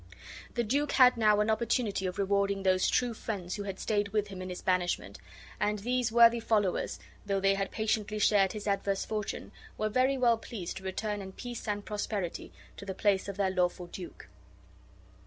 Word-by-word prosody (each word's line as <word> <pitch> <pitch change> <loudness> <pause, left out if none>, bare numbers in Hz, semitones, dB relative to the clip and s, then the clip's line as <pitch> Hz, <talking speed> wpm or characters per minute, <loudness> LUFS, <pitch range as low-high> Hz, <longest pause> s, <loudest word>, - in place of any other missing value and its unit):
The 240 - +1
duke 280 +6 0
had 255 -2 +7
now 215 -2 +4
an 215 +1 +2
opportunity 220 -3 0
of 180 - -5
rewarding 200 0 +1
those 185 -1 +3
true 245 -2 +1
friends 195 -5 -5
who - - -4
had 195 -1 -5
stayed 205 -2 0
with 205 0 -1
him 190 -2 -7
in 185 - -5
his 180 - -7
banishment; 180 -1 0 0.4
and 210 0 +1
these 245 +2 0
worthy 235 0 +6
followers, 210 -5 0 0.2
though 200 -1 0
they 195 0 +3
had 195 0 -2
patiently 215 -1 -1
shared 200 -2 +3
his 210 -2 -6
adverse 200 -1 0
fortune, 210 -2 -4 0.3
were 215 - 0
very 260 +4 +2
well 235 -3 +3
pleased 200 -6 -6
to 190 - -9
return 205 +2 -3
in 190 -1 -8
peace 240 +1 -7
and 205 -1 -2
prosperity, 205 -4 -3 0.3
to - - -8
the 190 - -4
palace 200 -1 +1
of 200 -1 -5
their 195 -2 +1
lawful 180 -1 0
duke. 175 0 -9
205 Hz, 190 wpm, -30 LUFS, 195-220 Hz, 0.4 s, had